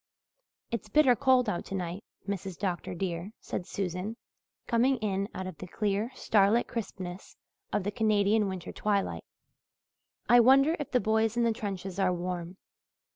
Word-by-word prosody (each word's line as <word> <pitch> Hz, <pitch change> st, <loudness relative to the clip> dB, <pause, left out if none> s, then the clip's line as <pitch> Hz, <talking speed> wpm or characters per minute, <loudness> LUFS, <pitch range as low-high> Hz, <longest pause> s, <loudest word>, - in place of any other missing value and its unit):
"It 235 Hz, -3 st, -1 dB
is 210 Hz, -, -18 dB
bitter 265 Hz, 0 st, +5 dB
cold 260 Hz, -1 st, +4 dB
out 175 Hz, -, -1 dB
tonight, 185 Hz, 0 st, -4 dB, 0.2 s
Mrs. 195 Hz, -3 st, -4 dB
Dr. 180 Hz, -2 st, -3 dB
dear," 175 Hz, +2 st, -3 dB
said 180 Hz, -, -5 dB
Susan, 195 Hz, +3 st, -3 dB, 0.5 s
coming 250 Hz, +3 st, +3 dB
in 200 Hz, -2 st, -1 dB
out 185 Hz, -, -4 dB
of 185 Hz, -, -7 dB
the 185 Hz, -, -7 dB
clear 205 Hz, +3 st, -1 dB
starlit 215 Hz, +2 st, +3 dB
crispness 190 Hz, -5 st, -6 dB, 0.3 s
of 205 Hz, -, 0 dB
the 205 Hz, -, -1 dB
Canadian 210 Hz, -1 st, +2 dB
winter 190 Hz, -2 st, -5 dB
twilight. 205 Hz, -2 st, -1 dB, 1.0 s
"I 240 Hz, -, +7 dB
wonder 275 Hz, +6 st, +6 dB
if 295 Hz, -, -4 dB
the 250 Hz, -, +3 dB
boys 220 Hz, +1 st, +1 dB
in 240 Hz, -, +3 dB
the 230 Hz, -1 st, +3 dB
trenches 195 Hz, -3 st, -5 dB
are 190 Hz, -1 st, +3 dB
warm." 180 Hz, 0 st, -4 dB
200 Hz, 155 wpm, -29 LUFS, 185-230 Hz, 1.0 s, I